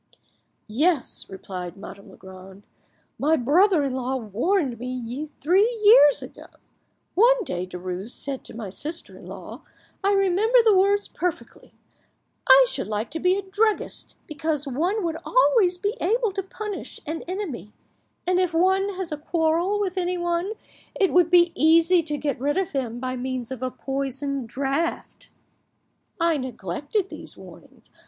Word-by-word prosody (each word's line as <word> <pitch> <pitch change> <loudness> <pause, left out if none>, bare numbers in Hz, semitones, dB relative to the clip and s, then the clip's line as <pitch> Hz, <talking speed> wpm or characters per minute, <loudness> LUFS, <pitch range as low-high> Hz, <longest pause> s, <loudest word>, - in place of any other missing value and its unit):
"Yes," 290 +6 0
replied 185 -1 -7
Madame 200 0 -11
Legrand, 190 +1 -13 0.6
"my 305 +3 +3
brother 320 - +3
in 275 -2 -1
law 260 0 -2
warned 255 - -1
me 250 +3 -5
three 385 - +3
years 410 - +7
ago. - - -11 0.7
One 480 +4 +4
day 180 - -4
Derues 180 +3 -6
said 270 +1 -5
to - - -10
my 220 -4 -6
sister 310 - -6
in - - -13
law,—I 400 0 -5
remember 395 +5 +3
the 430 -3 +6
words 400 +2 +3
perfectly,—'I 360 - 0
should - - -4
like 215 +3 -3
to 325 - -3
be 360 +2 +3
a 400 - -3
druggist, 415 +3 -1
because 305 -2 -3
one 350 - -1
would 325 -1 -2
always 455 -7 +3
be 410 +5 -2
able 450 +4 +1
to 390 +1 -3
punish 410 +1 -7
an 320 +2 -4
enemy; 350 - -5 0.5
and 365 0 +2
if 360 -3 0
one 380 +3 +2
has 365 -3 -4
a 300 - -3
quarrel 335 +5 0
with 380 -2 -1
anyone 350 +2 -1 0.4
it 385 -3 +2
would 355 -2 +5
be 345 -1 +5
easy 330 +3 +4
to 300 -2 -4
get 285 -3 -2
rid 290 +5 0
of 380 -2 -1
him 245 -4 -3
by 255 0 -3
means 255 -1 -4
of 260 -2 -6
a 255 - -1
poisoned 270 -1 -4
draught.' 275 +6 -3 0.9
I 335 -2 +2
neglected 270 - -3
these - - -9
warnings. - - -15
320 Hz, 145 wpm, -24 LUFS, 255-380 Hz, 0.9 s, years